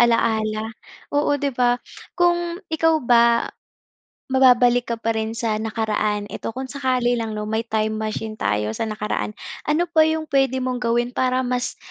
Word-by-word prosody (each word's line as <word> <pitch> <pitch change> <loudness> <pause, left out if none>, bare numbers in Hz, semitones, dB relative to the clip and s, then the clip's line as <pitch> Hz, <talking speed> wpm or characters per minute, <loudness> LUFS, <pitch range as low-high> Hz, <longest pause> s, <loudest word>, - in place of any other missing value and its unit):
ala-ala. 220 -2 +2 0.4
Oo, 290 0 +2
'di 285 -1 -2
ba. 245 0 +2 0.4
Kung 345 -1 +2 0.2
ikaw 325 0 +3
ba 235 -1 +4 0.9
mababalik 245 -2 +5
ka 235 - -1
pa 225 0 -1
rin 220 0 -3
sa 220 -2 -1
nakaraan 215 -2 -1
eto 225 - -5
kung 260 - -3
sakali 255 -3 0
lang 220 -1 -4
'no, 210 - -3
may 220 +2 -2
time 215 0 0
machine 220 0 -3
tayo 105 +1 0
sa 225 - -3
nakaraan, 210 0 -3 0.3
ano 310 +4 +3
pa 315 -2 +5
'yong 315 0 0
puwede 270 -2 +2
mong 255 -1 -2
gawin 240 0 +1
para 255 0 +1
mas 250 0 -2
240 Hz, 160 wpm, -22 LUFS, 220-260 Hz, 0.9 s, mababalik